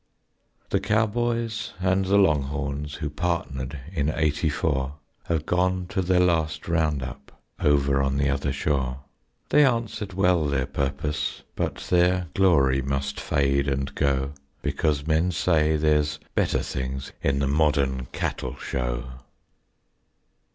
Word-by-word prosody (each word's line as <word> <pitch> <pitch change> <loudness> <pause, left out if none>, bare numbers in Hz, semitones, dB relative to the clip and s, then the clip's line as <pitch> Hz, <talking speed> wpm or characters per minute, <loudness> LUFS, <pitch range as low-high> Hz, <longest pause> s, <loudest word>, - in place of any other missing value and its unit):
The - - +3
cowboys 115 +1 0
and 95 +1 +2
the 100 +2 +3
longhorns 75 -4 0
Who 75 -2 -3
partnered 75 -5 -2
in 75 -4 0
eighty 80 0 +1
four 70 -2 -1 0.3
Have 80 -3 -1
gone 90 +1 +1
to 95 - 0
their 90 0 +2
last 80 -3 +1
round 80 -5 +1
up 65 - -9 0.2
Over 70 -2 +3
on 70 0 0
the 70 0 +2
other 70 0 0
shore; 70 -2 -1 0.5
They 150 - +6
answered 115 -6 0
well 90 -4 +3
their 70 -2 0
purpose, 70 +2 -2
But - - -1 0.2
their 90 -1 +3
glory 70 -9 +4
must 70 +1 -2
fade 70 0 +1
and 70 0 -1
go, 70 -1 0 0.3
Because 75 -3 0
men 80 +3 +2
say 80 -3 +2
there's 75 0 +2
better - - +1
things 65 +1 -4
In 70 0 +1
the 70 0 +1
modern 70 -3 +1
cattle - - -3
show. - - -2
75 Hz, 130 wpm, -25 LUFS, 70-90 Hz, 0.5 s, They